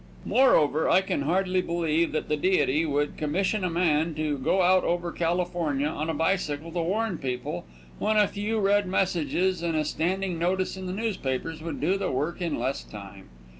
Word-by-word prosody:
Moreover, 160 - +3
I 185 - +5
can 190 - -2
hardly 185 +5 +1
believe 170 -1 0
that 155 - -2
the 150 - +1
Deity 160 -2 +2
would 145 0 -1
commission 190 +7 0
a 180 - +1
man 165 -2 +1
to 150 -2 -1
go 175 +8 +2
out 185 +1 +4
over 175 0 -1
California 170 -4 -1
on 155 +1 -3
a - - 0
bicycle 165 -3 -1
to 175 0 -1
warn 195 +2 -1
people, 125 - -4 0.3
when 215 +1 +1
a 210 -1 +5
few 215 +2 -2
red 205 0 +2
messages 185 0 0
and 170 -1 -1
a 155 - 0
standing 180 +3 -1
notice 185 +3 0
in 190 -1 -6
the - - -3
newspapers 165 - -3
would 165 +1 -5
do 195 +2 +1
the 195 - -1
work 150 +8 -2
in 170 -4 -1
less 135 +1 -2
time. 100 -2 -11
170 Hz, 185 wpm, -26 LUFS, 150-190 Hz, 0.3 s, I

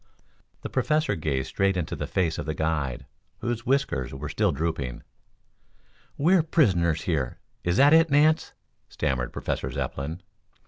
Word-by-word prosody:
The - - -4
Professor 155 +1 +1
gazed 70 -5 -2
straight 95 -1 +1
into 80 -3 -2
the - - -4
stern - - -23
face 85 -4 +1
of - - -5
the 80 - -2
guide, 75 -5 -1 0.3
whose 120 +2 -3
whiskers 125 - 0
were 70 +2 -5
still - - +1
drooping. 75 -7 -3 1.1
"We 165 +6 +3
are 185 - +6
prisoners 90 - +2
here? 70 -8 -1 0.3
Is 90 +2 +1
that 145 +3 +6
it, 165 0 +6
Nance?" 150 +2 +3 0.4
stammered 60 -2 -1
Professor - - -3
Zepplin. 80 +6 -4
85 Hz, 150 wpm, -26 LUFS, -, 1.1 s, are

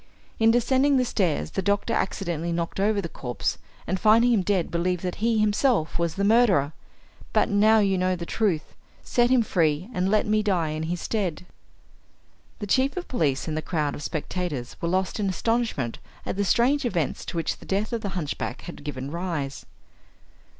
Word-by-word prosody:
In 225 0 +5
descending 260 +4 +3
the 255 - +2
stairs 165 - 0
the - - -1
doctor 200 +2 0
accidentally 170 -4 -2
knocked 170 +2 -3
over 205 +1 +2
the 170 - -4
corpse, 125 -6 -3 0.3
and 185 - -2
finding 230 +5 +5
him 215 - +3
dead 185 -2 0
believed 175 +1 -1
that 180 -1 -3
he 230 0 +2
himself 215 - +1
was 170 -1 0
the 200 - -1
murderer. 200 - +4 0.6
But - - +3
now 215 +2 +5
you 195 -3 +2
know 185 0 +1
the 170 -1 -6
truth 185 -6 -1 0.3
set 240 0 +2
him 255 -2 +4
free, 165 +1 0
and 185 -2 0
let 215 +1 +2
me 215 0 +2
die 185 -7 +1
in 155 +1 -3
his 175 0 -2
stead." 185 -6 -2 1.1
The 210 - -5
chief 265 - +1
of 360 - -4
police 150 - 0
and 155 - -2
the 155 - -1
crowd 155 -4 -1
of - - -7
spectators 155 -4 -4
were 170 - -1
lost 190 +3 0
in 200 -2 0
astonishment 220 - -1 0.3
at - - -3
the 200 - 0
strange 260 - +3
events 175 - -1
to - - -5
which 165 - -1
the - - -13
death 205 +4 -1
of 230 - -1
the 205 - -3
hunchback 150 -4 -4
had 170 - -9
given 140 -2 -5
rise. 165 -6 -4
190 Hz, 190 wpm, -25 LUFS, 165-220 Hz, 1.1 s, In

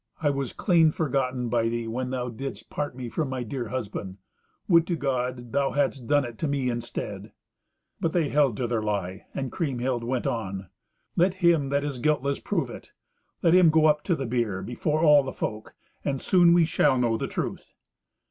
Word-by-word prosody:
I 145 -2 +2
was 135 -3 -3
clean 170 -5 +4
forgotten 130 -5 -1
by 115 -1 +1
thee 115 0 -3
when 125 +3 -3
thou 125 -1 -2
didst 135 +4 -7
part 145 -4 -3
me 125 -2 -5
from 145 +4 -2
my 130 -2 -3
dear 120 +1 -4
husband. 105 -5 -5 0.5
Would 170 -2 +5
to 175 - 0
God 125 -4 -2
thou 140 +1 +1
hadst 140 -3 0
done 145 -2 +3
it 120 -2 -9
to 160 - 0
me 135 -3 0
instead!" 120 0 -5 0.7
But 165 - 0
they 160 -4 +1
held 140 -7 +2
to 125 - -1
their 115 -2 -1
lie, 100 -3 -3
and 135 -2 -3
Kriemhild 130 -6 -1
went 125 +1 -2
on. 95 -5 -3 0.5
"Let 180 +2 +3
him 160 -5 +4
that 140 0 +1
is 140 -3 -4
guiltless 140 0 +1
prove - - -2
it. - - -11 0.5
Let 165 - +5
him 180 -2 +7
go 155 0 +4
up 150 -1 +3
to 175 - +2
the 135 - -4
bier 115 -5 -1
before 150 +6 -1
all 150 -2 +7
the 135 - -5
folk, 105 0 -5 0.3
and 135 -2 -1
soon 175 +2 +5
we 170 -2 +5
shall 145 -4 +2
know 120 -2 +2
the - - -2
truth." - - -5
130 Hz, 195 wpm, -26 LUFS, 120-150 Hz, 0.7 s, him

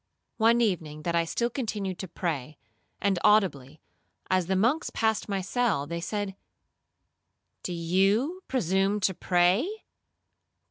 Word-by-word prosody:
'One 230 +1 +4
evening 160 -8 -1
that 170 +1 -1
I 170 0 +2
still 235 +8 -1
continued 205 -7 -3
to 190 - -5
pray, 155 -5 -4 0.4
and 195 -3 +1
audibly, 160 -9 +2 0.5
as 185 -2 +2
the 190 - +1
monks 235 - +1
passed 220 -1 0
my 195 -1 -1
cell 205 - 0
they 170 +3 -4
said, 205 +1 -3 1.3
'Do - - -4
you 195 - +1
presume 195 -3 +1
to 190 0 +2
pray? 180 - +2
190 Hz, 130 wpm, -27 LUFS, 170-220 Hz, 1.3 s, One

